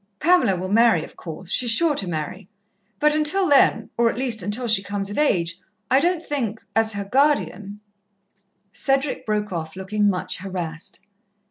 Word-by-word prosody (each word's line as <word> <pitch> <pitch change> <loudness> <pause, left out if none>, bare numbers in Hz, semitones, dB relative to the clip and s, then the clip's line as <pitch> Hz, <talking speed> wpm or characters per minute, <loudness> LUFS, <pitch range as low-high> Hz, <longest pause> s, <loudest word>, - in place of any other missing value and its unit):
"Pamela 305 - +3
will 185 +1 -4
marry, 225 -7 +4
of - - -12
course. 170 +2 -8
She's 245 - 0
sure 310 +7 +4
to 195 - -1
marry, 155 +1 -5 0.5
but 300 0 +3
until 310 +5 +2
then 285 -3 +3
or 235 -1 +4
at - - -4
least 245 -4 0
until 210 +7 -2
she 220 -3 +4
comes 200 0 -3
of - - -6
age 175 - +1 0.3
I 265 - +6
don't 345 +2 0
think 235 -9 -3 0.2
as 225 0 +2
her 200 -1 -4
guardian 210 -5 0 0.4
" 195 0 -47
Cedric 270 -2 0
broke 210 -2 -1
off, 160 -1 -5
looking 205 +2 0
much 180 -2 -2
harassed. 180 -3 -6
210 Hz, 170 wpm, -22 LUFS, 190-270 Hz, 0.5 s, I